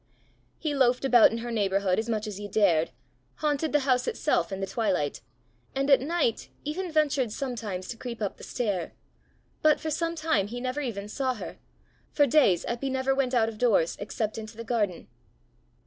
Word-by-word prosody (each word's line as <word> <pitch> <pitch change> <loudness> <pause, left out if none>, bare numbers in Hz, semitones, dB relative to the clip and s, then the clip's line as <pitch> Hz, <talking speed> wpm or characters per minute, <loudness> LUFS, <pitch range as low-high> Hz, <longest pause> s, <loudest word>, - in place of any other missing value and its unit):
He 305 -2 -2
loafed 255 -1 +3
about 245 -4 +7
in 230 - -2
her 240 - -4
neighbourhood 195 -3 +1
as 225 +1 -3
much 215 -1 -1
as 210 -2 -5
he 205 0 -6
dared, 185 -6 +3 0.5
haunted 300 0 0
the 295 - +3
house 255 -2 +1
itself 175 - 0
in 195 - -3
the 195 - -1
twilight, 190 -8 -1 0.5
and 275 +1 +1
at 270 - +7
night 295 -5 0
even 345 +5 -3
ventured 285 -6 +2
sometimes 220 -7 -4
to 235 - -5
creep 235 0 -6
up 205 -3 -3
the - - -13
stair, 200 -9 -2 0.7
but 310 -1 +4
for 315 0 -3
some 335 +2 -1
time 310 - +1
he 240 +3 -5
never 255 +3 -2
even 210 -7 -4
saw 255 +3 -1
her: 215 - -8 0.5
for 290 - +3
days 255 - +4
Eppy 240 +3 -2
never 265 0 +1
went 265 -2 0
out 225 -2 +4
of 220 -2 -6
doors 210 -9 +3
except 215 +1 -3
into 220 0 -9
the 230 - -5
garden. 210 -7 -1
240 Hz, 190 wpm, -27 LUFS, 205-275 Hz, 0.7 s, about